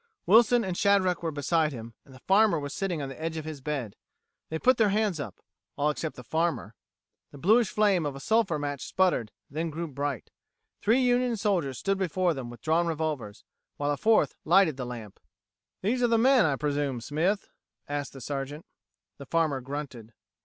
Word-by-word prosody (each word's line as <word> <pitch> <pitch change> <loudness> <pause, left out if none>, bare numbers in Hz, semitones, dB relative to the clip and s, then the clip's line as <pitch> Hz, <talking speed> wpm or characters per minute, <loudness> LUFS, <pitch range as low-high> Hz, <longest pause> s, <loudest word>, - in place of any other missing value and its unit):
Wilson 235 +2 +5
and 185 -3 -3
Shadrack 190 -2 +2
were 165 - -1
beside 155 +2 +1
him, 115 -3 -8
and 135 - -16
the - - -14
farmer 200 -2 +4
was 145 0 -5
sitting 180 -6 -2
on 135 - -4
the 135 - -10
edge 165 0 -3
of 155 - -5
his 155 -3 -7
bed. 130 -7 -4 0.5
They 160 - -2
put 255 +9 +3
their 220 -3 +4
hands 205 -4 0
up 120 -10 -6 0.4
all 150 +1 +1
except 155 +1 -4
the 125 - -10
farmer. 160 - -1 0.6
The - - -13
bluish 215 - +4
flame 205 -5 +2
of 145 -2 -3
a - - -7
sulphur 205 0 +1
match 145 -2 -4
sputtered, 175 -13 +1 0.2
then 160 +4 -3
grew 165 +2 -4
bright. 140 -3 -4 0.5
Three 230 +5 +3
Union 245 -1 +2
soldiers 180 - 0
stood 195 +5 -1
before 185 -1 +1
them 130 -4 -6
with 120 -1 -12
drawn 165 +2 +2
revolvers, 155 -10 -3 0.3
while 145 0 0
a - - +1
fourth 215 -3 +3
lighted 170 -2 +4
the 125 -2 -5
lamp. 115 -5 -8 0.6
"These 240 +6 +1
are 240 - +4
the 230 -1 +3
men, 255 -2 +5
I 140 - +1
presume, 145 -3 -1
Smith?" 170 - -1 0.4
asked 145 -1 -4
the 135 - -10
Sergeant. 145 +3 -5 0.5
The 140 - -9
farmer 155 -4 +1
grunted. 130 -4 -7
155 Hz, 190 wpm, -28 LUFS, 140-195 Hz, 0.6 s, Wilson